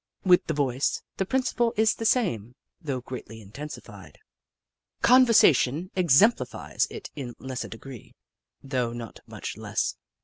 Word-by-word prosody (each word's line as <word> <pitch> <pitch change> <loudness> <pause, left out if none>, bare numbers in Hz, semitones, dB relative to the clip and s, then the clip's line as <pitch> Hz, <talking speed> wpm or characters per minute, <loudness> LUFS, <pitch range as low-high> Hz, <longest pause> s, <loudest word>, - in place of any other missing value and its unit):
With 180 0 +5
the 160 - -1
voice, 135 -2 0
the 190 - -1
principle 250 -2 0
is 220 0 +4
the 225 - -2
same, 125 - 0 0.3
though 140 -6 -3
greatly 120 -3 -8
intensified. 105 - -10 0.9
Conversation 185 - +5
exem 185 - +6
plifies - - -3
it 435 - -9
in 125 -5 -6
lesser 130 -1 -5
degree, 120 +1 -11 0.5
though 125 -4 -2
not 120 -2 -8
much - - -7
less. - - -2
140 Hz, 130 wpm, -26 LUFS, 120-195 Hz, 0.9 s, exem